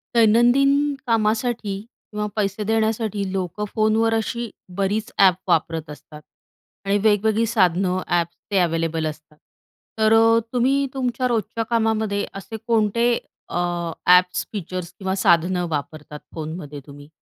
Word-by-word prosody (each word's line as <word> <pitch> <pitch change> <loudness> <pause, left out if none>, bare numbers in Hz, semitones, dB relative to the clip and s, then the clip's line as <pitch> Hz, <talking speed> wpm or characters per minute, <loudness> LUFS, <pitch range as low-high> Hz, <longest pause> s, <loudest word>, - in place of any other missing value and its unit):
दैनंदिन 240 +5 +5 0.4
कामासाठी 225 -1 0
किंवा 210 -1 -7
पैसे 205 0 -1
देण्यासाठी 220 -2 0
लोकं 195 +2 -3
फोनवर 220 +1 +2
अशी 230 +1 -2 0.3
बरीच 210 +4 -1
ॲप 190 -2 +6
वापरत 165 -2 0
असतात 150 +1 -11 0.6
आणि 200 +1 +2
वेगवेगळी 220 +1 +3
साधनं, 185 -2 +2
ॲप्स 170 -1 0
ते 200 - +2
अव्हेलेबल 165 -2 0
असतात. 155 0 -9 0.6
तर 220 0 +4
अ, 225 0 +5
तुम्ही 265 +3 +2
तुमच्या 255 -1 -1
रोजच्या 230 -1 -1
कामामध्ये 220 -3 +1 0.2
असे 220 +4 -8
कोणते 230 0 +2 0.4
अ, - - -3 0.5
ॲप्स, 180 0 +4
फीचर्स 185 -3 -5
किंवा 190 -1 -2
साधनं 175 -1 +2
वापरतात 150 0 -5 0.2
फोनमध्ये 155 -2 -6
तुम्ही? 145 0 -13
205 Hz, 120 wpm, -22 LUFS, 175-225 Hz, 0.6 s, ॲप